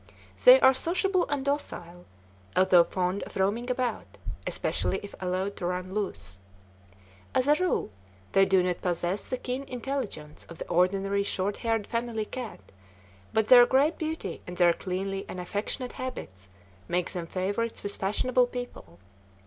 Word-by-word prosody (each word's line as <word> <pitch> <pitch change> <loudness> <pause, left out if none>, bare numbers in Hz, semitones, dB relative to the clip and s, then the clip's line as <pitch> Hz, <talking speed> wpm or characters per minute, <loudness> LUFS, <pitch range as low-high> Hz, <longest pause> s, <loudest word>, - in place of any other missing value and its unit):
They - - +10
are 265 - +7
sociable 365 +6 +1
and 285 -2 -1
docile, 175 -11 -3 0.5
although 185 -2 +6
fond 180 +2 -1
of - - -8
roaming 210 +6 0
about, 250 -1 -2 0.3
especially 190 - 0
if 205 - -9
allowed 185 +2 -2
to 175 - -2
run 180 +1 -3
loose. 190 - -4 1.0
As 255 - +2
a 295 - +7
rule, 360 - 0 0.4
they 195 - +5
do 190 -1 +4
not 180 -1 -1
possess 175 +2 -2
the 255 - -1
keen 250 +1 -3
intelligence 245 - -5
of 170 - -9
the - - -6
ordinary 195 +3 +2
short 200 0 -1
haired 225 -3 0
family 230 -2 -2
cat, 245 - -7 0.7
but 220 -1 +1
their 245 0 +9
great 285 +5 +3
beauty 315 - -4
and 180 0 -7
their 175 -1 +5
cleanly 195 +2 -3
and 185 - -5
affectionate 205 +7 -3
habits 100 - -7 0.4
make 175 0 -1
them 175 -2 -4
favorites 200 +6 -2
with 205 - -4
fashionable 245 +6 +2
people. 245 - -8
200 Hz, 150 wpm, -28 LUFS, 180-250 Hz, 1.0 s, They